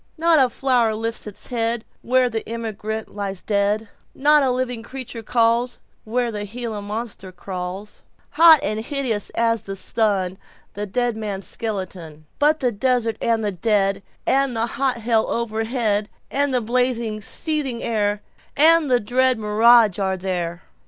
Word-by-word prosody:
Not 330 -1 +4
a 260 -2 +4
flower 240 -4 +1
lifts 225 0 -3
its 205 - -8
headWhere 240 +1 0
the 225 0 -2
emigrant 220 -1 -5
lies 200 -2 -4
dead; 205 +1 0 0.3
Not 295 +2 +4
a 270 - +2
living 250 -2 -2
creature 245 -1 -7
callsWhere 235 +1 0
the 210 -1 -4
Gila 220 0 -5
Monster 205 -2 -6
crawls, 185 +2 -7 0.3
Hot 320 0 +8
and 215 -6 -1
hideous 235 -3 -2
as 230 -1 +1
the 195 - -6
sun, 190 -2 0
To - - -36 0.3
the 205 +1 -4
dead 240 +3 0
man's 205 -3 -4
skeleton; 185 -8 -5
But 305 +2 +3
the 250 -2 +2
desert 235 0 0
and 225 -2 +1
the 205 - 0
dead, 200 0 +1 0.2
And 270 -1 +2
the 225 0 +1
hot 265 +1 -1
hell 225 -1 +1
overhead, 220 -2 -1 0.2
And 285 0 +1
the 250 -1 +1
blazing, 235 -2 0
seething 275 +1 -1
air, 210 -2 0 0.3
And 320 0 +6
the 250 -1 +4
dread 255 +3 +2
mirage 220 -1 +5
are 190 -1 0
there. 175 -2 -3
225 Hz, 150 wpm, -22 LUFS, 205-250 Hz, 0.3 s, Hot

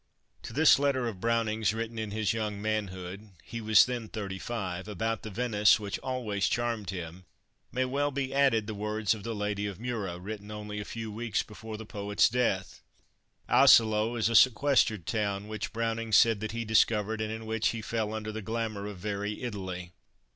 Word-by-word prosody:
To - - -8
this 155 -1 +6
letter 135 -3 +1
of 100 -5 -6
Browning's, 110 -2 +1
written 115 0 -4
in 110 -1 -3
his 110 0 0
young 105 -2 -3
manhood 100 -2 -4
he 115 - -6
was 110 0 +6
then 120 -3 -4
thirty 100 -3 -5
five 95 -5 -4
about 110 +2 -2
the 110 - -7
Venice 105 -1 +3
which 100 -2 -4
always 115 -6 -1
charmed 115 -5 -1
him, 90 -1 -6 0.5
may 130 - -1
be - - 0
well 140 +3 0 0.2
added 135 -6 +3
the 110 - -4
words 105 0 0
of 110 - -8
the 115 +2 -4
Lady 105 0 -2
of 100 -3 -6
Mura, 110 -7 -3
written 105 +3 -7
only 105 0 -6
a 105 - -5
few 115 -2 -6
weeks 115 +1 -1
before 110 +1 -8
the 110 - -8
poet's 100 -1 +1
death. 125 +1 -1 0.7
Asolo 110 +1 +5
is 115 -2 +1
a 115 - -1
sequestered 120 - +4
town, 100 -1 -1
which 110 +2 -4
Browning 115 -1 -2
said 110 +1 +5
that 110 0 -4
he 115 +1 -3
discovered, 110 0 +2
and 110 0 -2
in 110 0 -6
which 110 0 0
he 115 -2 -2
fell 110 -1 -2
under 110 0 -4
the 110 +1 -5
glamour 110 -1 -3
of 105 -2 -7
very 105 +3 -4
Italy. 95 -6 -5
110 Hz, 190 wpm, -29 LUFS, 105-115 Hz, 0.7 s, this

